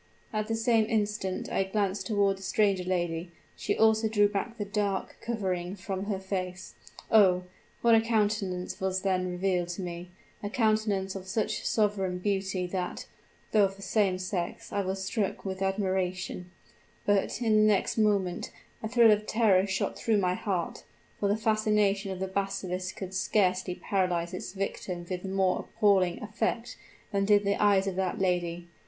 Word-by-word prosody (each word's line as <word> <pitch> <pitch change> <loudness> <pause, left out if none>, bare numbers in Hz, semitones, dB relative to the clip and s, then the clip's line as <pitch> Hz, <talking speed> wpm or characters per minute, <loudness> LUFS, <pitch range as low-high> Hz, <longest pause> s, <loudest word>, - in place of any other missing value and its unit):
At 215 0 -1
the 225 - 0
same 225 -1 +3
instant 210 -4 -1
I - - +2
glanced 195 0 -1
toward 200 -3 +2
the - - -13
stranger 195 -1 +2
lady; 175 -2 -1 0.3
she - - -2
also 220 0 +4
drew 205 -1 +4
back 210 +3 -3
the 205 - -3
dark 200 -2 -2
covering 190 -5 -2
from 190 0 -4
her 200 -2 -1
face. 190 -1 -4 0.4
Oh! 185 -4 +5 0.4
what 235 -1 +6
a 225 - +6
countenance 210 -6 -1
was 190 0 -1
then 185 -2 +1
revealed 180 -1 0
to 175 +2 -5
me 175 0 -6 0.3
a 205 - -3
countenance 215 -4 +1
of 190 -1 -7
such 210 +3 -1
sovereign 200 -4 +1
beauty 190 -1 -1
that, 180 0 -4 0.5
though 210 -2 +5
of 195 0 -3
the 195 - -12
same 195 -4 +2
sex, 185 -1 -4
I 200 - +1
was 190 0 -3
struck 205 0 -2
with 190 0 -4
admiration; 185 -2 -1 0.6
but, 205 +1 +1
in 225 -3 +2
the 215 0 +5
next 195 - 0
moment, 200 -4 +1 0.3
a 220 - -2
thrill 230 -1 +6
of 210 0 +1
terror 200 -4 +3
shot 190 -1 -2
through 225 -3 +2
my 180 -2 +2
heart 185 -3 -3 0.4
for 200 - +1
the 205 - +2
fascination 210 -2 +1
of 185 - -5
the 190 - -2
basilisk 190 -1 -3
could 190 -1 -6
scarcely 185 -1 +1
paralyze 180 -3 -1
its 185 - -6
victim 185 -3 -4
with 180 -1 -4
more 190 -1 +1
appalling 190 -4 +2
effect 225 +3 -2 0.4
than 200 -2 +1
did 205 0 +4
the 200 0 +1
eyes 200 -2 +4
of 195 -2 -2
that 190 -2 -1
lady. 175 -2 -1
195 Hz, 170 wpm, -29 LUFS, 185-210 Hz, 0.6 s, what